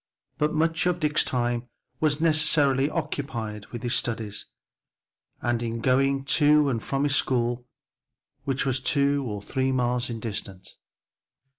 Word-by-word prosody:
But 150 0 +2
much 165 +2 +1
of 175 -1 0
Dick's 150 -2 +2
time 120 -1 -1 0.3
was 150 -1 +1
necessarily 150 -4 +3
occupied 120 - -4
with 120 0 -8
his 120 0 -1
studies, 110 -5 -2 1.0
and 120 -1 0
in 115 0 -3
going 135 +3 +2 0.2
to 150 0 +5
and 115 -4 -1
from 135 +4 -1
his 145 -1 +2
school, 120 -2 0 0.8
which 135 -1 -1
was 135 -1 +1
two 140 +1 +2
or 105 -2 -5
three 130 +4 -1
miles 125 -1 0
distant. 100 -5 -6
130 Hz, 135 wpm, -26 LUFS, 120-145 Hz, 1.0 s, to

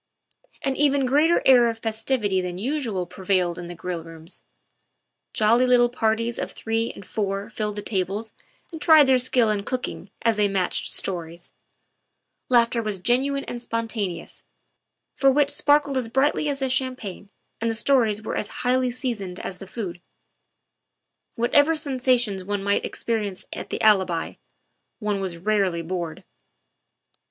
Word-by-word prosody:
An 270 -1 0
even 280 -2 +3
greater 300 +6 +3
air 245 -3 +6
of 225 - -4
festivity 220 -3 -1
than 180 -1 -4
usual 230 -5 -2
prevailed 180 -1 -1
in 175 - -7
the 175 - -7
grill 175 -1 -5
rooms. 165 +1 -12 0.9
Jolly 230 +4 +3
little 245 -1 +5
parties 230 0 0
of - - -3
three 225 +1 -2
and 200 - -12
four 200 0 -3
filled 210 -1 -3
the 205 - -5
tables 200 +2 -2 0.4
and 320 -2 -8
tried 315 -3 +7
their 260 -1 +4
skill 245 -3 +3
in 205 -1 -1
cooking 250 -5 -4
as 225 -2 +2
they 210 -1 +3
matched 190 -2 -1
stories; 170 -2 -2 1.0
laughter 235 -1 +3
was 215 -3 -3
genuine 270 +7 +1
and 240 - -6
spontaneous, 225 -6 -4 0.7
for 275 - +3
wit 285 +1 +3
sparkled 290 -2 +2
as 250 -3 -1
brightly 285 +4 +1
as 280 - -2
the 270 -1 -2
champagne 250 -7 -3 0.3
and 230 - +1
the 225 - -1
stories 220 -4 +2
were - - -3
as 210 - -2 0.2
highly 255 0 +2
seasoned 235 -8 -4
as 185 - -6
the 195 - -9
food. 180 -5 -6 1.3
Whatever 285 +7 +3
sensations 255 - 0
one 200 +1 -3
might 200 0 +1
experience 210 -5 -3
at - - -7
the - - -3
Alibi, 190 -6 +3 0.6
one 210 -3 -2
was 185 -3 -4
rarely 190 -3 0
bored. 170 -1 -4
225 Hz, 150 wpm, -24 LUFS, 195-255 Hz, 1.3 s, tried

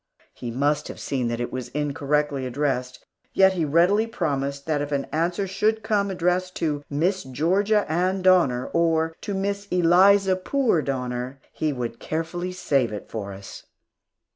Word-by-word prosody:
He 120 - -6
must 140 +5 0
have - - -8
seen 130 -3 -2
that 115 0 -2
it 120 - -3
was 130 -2 -4
incorrectly 145 -1 -1
addressed, 125 -1 -2 0.3
yet 190 0 +5
he 170 -4 0
readily 180 +9 +3
promised 140 -8 -2
that 155 -2 0
if 145 0 -4
an 140 -1 0
answer 175 +5 0
should 215 +3 0
come 205 -2 +1
addressed 180 0 0
to 150 -3 -1
"Miss 175 +7 0
Georgia 190 - +1
Ann 185 +4 0
Donner," 170 -10 +4
or 165 -1 +1
to 200 - -4
"Miss 200 +1 -2
Eliza 185 +2 +5
Poor 225 - +1
Donner," 125 -1 -3
he 155 -1 -1
would 120 -3 -4
carefully 165 +3 -3
save 140 -9 0
it 105 - -7
for 100 -3 -5
us. 95 0 -10
160 Hz, 160 wpm, -24 LUFS, 135-185 Hz, 0.3 s, yet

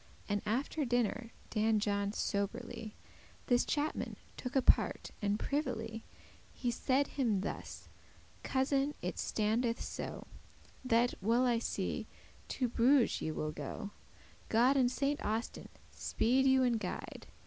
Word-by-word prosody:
And 205 -1 0
after 270 +7 0
dinner 240 -2 0 0.2
Dan 220 0 +3
John 200 -1 0
soberly 205 +1 -3 0.5
This 245 -1 +4
chapman 295 0 -1 0.2
took 250 +1 -6
apart, 265 - +3
and 205 0 +1
privily 225 -5 -2 0.5
He 245 - -2
said 265 +4 +2
him 230 -9 0
thus: - - -6 0.5
"Cousin, 275 +2 +1
it - - -3
standeth 230 +2 0
so, - - -5 0.6
That, 240 -1 +3
well 230 +5 +3
I 240 -2 +3
see, - - -2 0.4
to 255 - -1
Bruges 245 +2 +3
ye - - -1
will 155 0 -2
go; 155 +8 -6 0.6
God 245 +5 +4
and 250 -2 +4
Saint 280 +2 0
Austin 220 +3 -3 0.2
speede 260 +4 +2
you 265 0 +5
and 240 -3 +2
guide. - - -6
235 Hz, 125 wpm, -34 LUFS, 215-265 Hz, 0.6 s, you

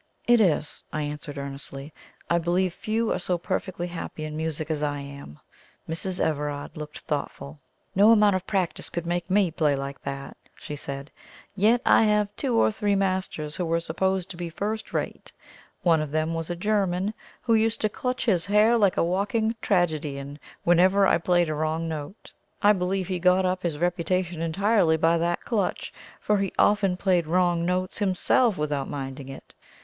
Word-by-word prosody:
"It 240 -1 +5
is," 160 -6 +1
I 155 - -2
answered 150 0 -6
earnestly. 140 +1 -7 0.3
"I 170 - +2
believe 175 +2 +1
few 225 +1 -1
are - - 0
so 180 - -1
perfectly 175 +1 -3
happy 170 -2 -6
in 155 0 -6
music 160 0 -3
as 150 -2 -1
I 145 -1 -1
am." 140 - -9 0.5
Mrs. 180 +3 -4
Everard 145 -2 -2
looked 150 -1 -8
thoughtful. 70 +1 -5 0.3
"No 205 +3 +6
amount 210 -3 +5
of 185 0 -3
practice 190 -4 -1
could 170 0 -4
make 175 +1 -2
ME 190 -2 +3
play 150 -3 +2
like 140 0 -5
that," 140 0 -6 0.2
she 150 - -7
said; 140 0 -6 0.4
"yet 225 +5 +3
I - - +6
have 210 -1 +2
had 205 - -40
two 260 -4 0
or - - +4
three 210 -1 0
masters 185 -6 -1
who 180 - -1
were 165 0 +1
supposed 190 +3 -1
to 175 - -8
be 175 -1 -4
first 210 +6 -4
rate. - - -4 0.5
One 165 -3 +4
of 150 -2 -4
them 155 +1 0
was 165 0 -3
a 175 - -2
German, 195 0 0 0.3
who 230 - +2
used 225 0 +2
to 215 - +3
clutch 250 +4 -3
his 190 -6 +2
hair 210 +3 +4
like 200 -3 +3
a - - +3
walking 210 +6 0
tragedian 150 -6 -1 0.2
whenever 185 +3 +5
I 170 - +3
played 175 0 +2
a 155 - -1
wrong 155 +2 -1
note. 155 +5 -7 0.3
I 205 +1 +7
believe 185 -1 -1
he 185 -2 -2
got 185 +1 +4
up 185 0 0
his 170 -5 -2
reputation 175 0 -1
entirely 175 0 +2
by 165 +1 +3
that 170 +1 -1
clutch, 210 -6 -1 0.3
for 210 -1 +1
he 195 -2 -1
often 195 -3 +3
played 180 -4 +1
wrong 175 0 +2
notes 185 +1 -1
himself 205 +3 +2
without 145 -2 -2
minding 135 -1 -6
it. 135 - -11
175 Hz, 185 wpm, -26 LUFS, 155-195 Hz, 0.5 s, I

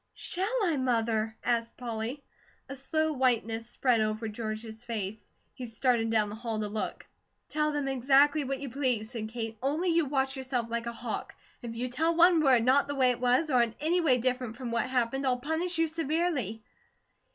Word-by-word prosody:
"Shall 375 +3 -1
I, 335 -6 +1
Mother?" 225 -3 0
asked 235 -1 -1
Polly. 240 +3 -4 0.4
A 275 - -6
slow 315 +4 0
whiteness 230 -3 0
spread 240 -2 +2
over 215 +1 -1
George's 220 +1 -6
face; 220 -3 -5 0.2
he 250 - -7
stared 230 0 +1
down 215 -2 +2
the - - -7
hall 225 -1 -3
to 210 - -2
look. 215 +1 -4 0.4
"Tell 300 0 +1
them 290 -2 -2
exactly 275 +3 +4
what 270 0 -3
you 280 - -4
please," 245 -5 -1
said 220 -3 -5
Kate, 225 -1 -5
"only 305 +7 0
you 335 -1 +3
watch 270 -1 0
yourself 255 -3 -2
like 235 0 -2
a - - -2
hawk. 235 0 -5 0.3
If 235 -2 -6
you 245 +2 -2
tell 320 +7 0
one 345 0 +6
word 260 -6 +5
not 270 +3 +4
the 285 - -3
way 260 -2 +4
it 245 - -3
was, 255 +5 +2
or 250 -2 +5
in 230 -1 0
any 340 +4 +2
way 270 -7 +4
different 250 -2 -2
from 245 -2 -5
what 235 +2 0
happened, 255 +1 0
I'll 250 -1 +2
punish 320 +6 -2
you 325 0 +3
severely." 310 - -1
250 Hz, 195 wpm, -29 LUFS, 230-285 Hz, 0.4 s, one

